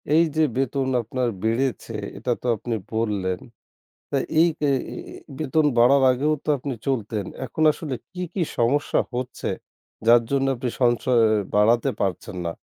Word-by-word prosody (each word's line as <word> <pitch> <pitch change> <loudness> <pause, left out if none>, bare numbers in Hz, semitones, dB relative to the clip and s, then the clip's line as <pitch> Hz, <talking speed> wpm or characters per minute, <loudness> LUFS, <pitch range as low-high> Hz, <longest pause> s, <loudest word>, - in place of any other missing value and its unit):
এই 165 - +6
যে 160 - +3
বেতন 135 0 0
আপনার 120 +2 -2
বেড়েছে, 115 +1 -1 0.2
এটা 125 - -2
তো - - -4
আপনি 115 +2 -3 0.2
বললেন। 100 -5 -1 0.7
তা - - 0 0.2
এই 170 - +6
এ্যা 145 - +3 0.7
বেতন 155 +1 +1
বাড়ার 135 +4 +6
আগেও 140 +5 +1
তো - - -11
আপনি 135 +1 -4
চলতেন। 110 -6 -1 0.2
এখন 155 - -3
আসলে 150 -3 -5 0.2
কী, 180 -1 -5
কী 190 - 0 0.2
সমস্যা 130 +5 +2
হচ্ছে? 125 0 -4 0.6
যার 120 0 +7
জন্য 135 -1 +2
আপনি 125 +1 -3
সঞ্চয় 120 0 +3 0.3
বাড়াতে 110 +3 +4
পারছেন 95 -1 -3
না। 85 - -2
125 Hz, 145 wpm, -24 LUFS, 115-140 Hz, 0.7 s, যার